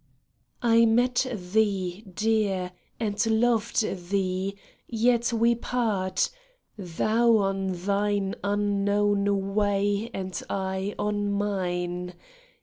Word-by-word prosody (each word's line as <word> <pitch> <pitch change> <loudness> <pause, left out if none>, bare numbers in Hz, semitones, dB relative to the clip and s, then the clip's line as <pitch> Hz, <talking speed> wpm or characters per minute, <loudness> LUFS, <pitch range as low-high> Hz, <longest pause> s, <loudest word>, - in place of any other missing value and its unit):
MET 235 +2 +4
thee, 195 -2 -1
dear, 200 -3 0 0.3
and 210 -1 0
loved 230 0 +2 0.3
thee 195 0 -1 0.2
— - - -37
yet 235 +1 +2
we 235 +1 +3
part. 220 -6 -1 0.4
Thou 220 +5 +2
on 195 -1 0 0.2
thine 200 -1 0
unknown 200 -1 +1
way 205 +1 +1
and 185 -1 -4
I 190 +1 -2
on 205 0 -1
mine. 180 -3 -2
205 Hz, 90 wpm, -26 LUFS, 195-220 Hz, 0.4 s, MET